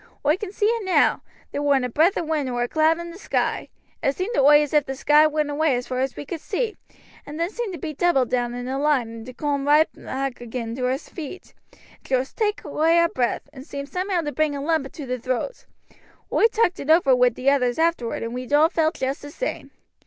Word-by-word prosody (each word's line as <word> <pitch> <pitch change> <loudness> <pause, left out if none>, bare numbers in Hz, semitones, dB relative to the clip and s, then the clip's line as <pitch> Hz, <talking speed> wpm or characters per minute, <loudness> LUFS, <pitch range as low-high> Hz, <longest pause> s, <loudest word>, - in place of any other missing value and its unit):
Oi 300 +2 +4
can 380 0 -6
see 415 - -1
it 460 0 +1
now. 375 -2 +3 0.3
There 285 - -3
warn't 280 -3 +2
a - - -3
breath 320 - +3
of 340 - -1
wind 305 -3 -1
nor 245 -1 -1
a - - -1
cloud 315 +3 +3
i' 340 0 -6
the 350 - -12
sky. - - -1 0.3
It 275 - +1
seemed 380 +6 -3
to - - +3
oi 295 +2 +7
as 295 - -6
if 300 -2 +3
the 270 - -3
sky 300 +3 +5
went 305 -1 -1
away 295 -2 +2
as 245 0 -3
far 255 -1 -3
as 265 0 -1
we - - -7
could 325 +2 -6
see, 435 +2 -2 0.5
and 300 +2 -8
then 340 +3 -1
seemed 460 -4 -4
to 340 - -6
be 310 0 -5
doubled 275 -6 +2
down 245 -1 0
in 245 0 -5
a 265 +1 -2
line 285 -6 +2
and 225 0 -9
to 255 - -8
coom 285 -1 -1
roight 300 +2 +6
back 265 -2 -5
agin 230 -1 -5
to 250 -1 0
our 260 +1 +1
feet. 320 +4 -9 0.2
It - - -24 0.2
joost 260 0 -1
took 420 -2 -1
away 315 +3 +2
our 335 0 +4
breath, 245 -5 -1
and 265 - -10
seemed 280 0 -7
somehow 365 -1 -1
to 295 -2 -3
bring 305 -1 0
a 280 - -4
lump 315 -3 0
into 285 +1 -9
the 255 0 -3
throat. 255 - -3 0.7
Oi 450 - +5
talked 445 -5 +1
it 280 - -6
over 315 -5 +5
wi' 250 0 +5
the 255 +3 +1
others 250 -3 +1
afterward 320 -10 0
and 230 +1 -4
we'd 250 +1 -6
all 305 +2 +6
felt 320 0 +1
just 265 +1 -2
the 290 - -8
same. - - -4
290 Hz, 250 wpm, -23 LUFS, 260-330 Hz, 0.7 s, oi